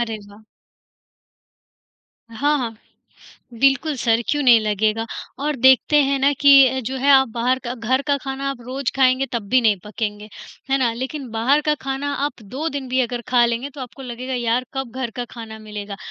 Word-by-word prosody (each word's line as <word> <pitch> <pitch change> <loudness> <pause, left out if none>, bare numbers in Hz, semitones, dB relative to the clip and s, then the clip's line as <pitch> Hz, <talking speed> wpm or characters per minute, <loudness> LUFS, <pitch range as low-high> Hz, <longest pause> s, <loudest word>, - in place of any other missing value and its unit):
अरे 225 -2 -2
वाह! 205 +2 -16 1.9
हाँ, 285 +7 0
हाँ। 230 -3 -3 0.9
बिल्कुल, 275 +3 +3
सर 230 -2 +1
क्यों 295 -1 +1
नहीं 240 -4 +6
लगेगा 215 +1 0 0.3
और 295 +1 -2
देखते 260 +3 +4
हैं 275 0 0
ना 275 +2 +3
कि 285 - +6 0.2
अ, 260 +1 -2
जो 260 +2 -4
है 280 +2 +2
आप 265 -1 +5
बाहर 250 +2 +1
का 240 +1 -3
घर 255 +3 0
का 285 -1 +2
खाना 270 0 -4
आप 270 -3 -7
रोज़ 260 0 -2
खाएँगे 260 0 +3
तब 235 -2 -2
भी 255 +3 +4
नहीं 220 -3 +3
पकेंगे, 210 0 -5 0.4
है 270 - +3
ना? 245 -3 +1
लेकिन 260 +3 -5
बाहर 240 +7 +2
का 300 - +3
खाना 270 +1 -3
आप 290 -5 -5
2 265 +10 -4
दिन 280 -4 -5
भी 255 +1 +1
अगर 245 -1 -2
खा 245 -1 +4
लेंगे 235 +4 -3
तो 280 - -9
आपको 255 +1 -9
लगेगा 255 +1 -5
यार, 240 +1 0
कब 265 -2 -4
घर 250 -3 -3
का 245 - -3
खाना 225 -2 -9
मिलेगा। 210 -2 -7
255 Hz, 195 wpm, -21 LUFS, 230-270 Hz, 1.9 s, नहीं